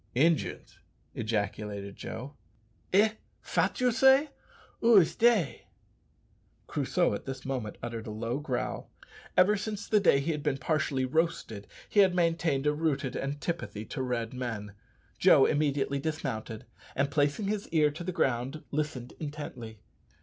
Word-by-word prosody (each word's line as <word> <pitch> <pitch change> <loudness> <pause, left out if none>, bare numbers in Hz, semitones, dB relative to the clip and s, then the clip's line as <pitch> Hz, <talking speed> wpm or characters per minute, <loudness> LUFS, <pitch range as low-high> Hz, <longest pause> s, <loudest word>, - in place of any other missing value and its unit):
"Injuns!" 160 +4 +1 0.3
ejaculated 105 -2 -3
Joe. 135 +5 -7 0.6
"Eh! 205 +3 +5 0.3
fat 185 +3 0
you 250 -1 +3
say? 265 +5 +5 0.5
Ou 230 -2 +7
is 175 -5 +4
dey?" 220 - +2 1.0
Crusoe - - 0
at - - -5
this 130 -1 -6
moment 130 -6 -3
uttered 115 -1 -5
a - - -4
low 115 +5 -3
growl. 135 -4 -3 0.5
Ever 205 +3 +6
since 210 0 -4
the 215 - +4
day 175 -8 +4
he 145 +4 -1
had 150 -2 -3
been 135 - 0
partially 140 -2 0
roasted 135 -8 -1 0.2
he 210 - +1
had 190 -3 +5
maintained 165 -5 +1
a 150 - +3
rooted 145 -4 -1
antipathy 145 -5 -4
to 130 - -5
Red 120 -2 -2
men. 115 -5 -5 0.5
Joe - - +7
immediately 140 -1 +1
dismounted, 135 -8 -4 0.3
and 140 +1 +1
placing 145 +7 +1
his 205 0 -2
ear 150 -2 +3
to 160 +4 -7
the 185 - -2
ground 130 0 -1
listened 140 -5 -3
intently. 135 -8 -7
145 Hz, 140 wpm, -29 LUFS, 120-170 Hz, 1.0 s, Ou